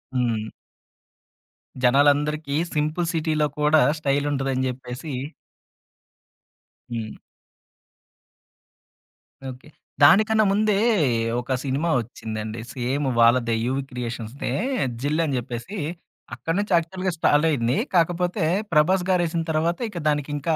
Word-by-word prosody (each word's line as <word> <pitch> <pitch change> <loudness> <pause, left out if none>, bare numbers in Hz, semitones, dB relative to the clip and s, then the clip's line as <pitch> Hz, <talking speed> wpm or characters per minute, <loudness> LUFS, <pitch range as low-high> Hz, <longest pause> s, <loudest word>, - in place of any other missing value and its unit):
హ్మ్. 115 -3 -1 1.3
జనాలందరికీ 145 +3 +3 0.2
సింపుల్ 155 +3 -1
సిటీలో 155 -2 +1
కూడా 150 +1 +4 0.2
స్టైల్ 145 -1 0
ఉంటుదని 135 -2 -1
చెప్పేసి 130 +3 -7 1.8
హ్మ్. 115 -2 -5 2.3
ఓకే. 130 +2 -11 0.4
దానికన్నా 215 +7 +6
ముందే 210 +1 +2 0.6
ఒక 125 +2 -2
సినిమా 140 +5 -1
ఒచ్చిందండి. 110 -1 -6
సేమ్ 130 +3 -2
వాళ్ళదే 115 0 +4
యూవి 135 +2 -1
క్రియేషన్స్‌దె 120 0 -5 0.5
'జిల్' 150 +4 +1
అని 140 -4 -1
జెప్పేసి 120 - -6 0.6
అక్కడి 160 +8 -3
నుంచి 205 0 -3
యాక్చువల్‌గా 185 +3 -2
స్టార్ట్ 150 0 +3
అయింది. 125 -3 +1 0.2
కాకపోతే 175 +2 +1 0.3
'ప్రభాస్' 180 +4 +3
గారెసిన 170 -2 +1
తర్వాత 165 +2 0
ఇక 175 -5 -6
దానికింకా 145 +1 -1
145 Hz, 95 wpm, -23 LUFS, 125-165 Hz, 2.3 s, దానికన్నా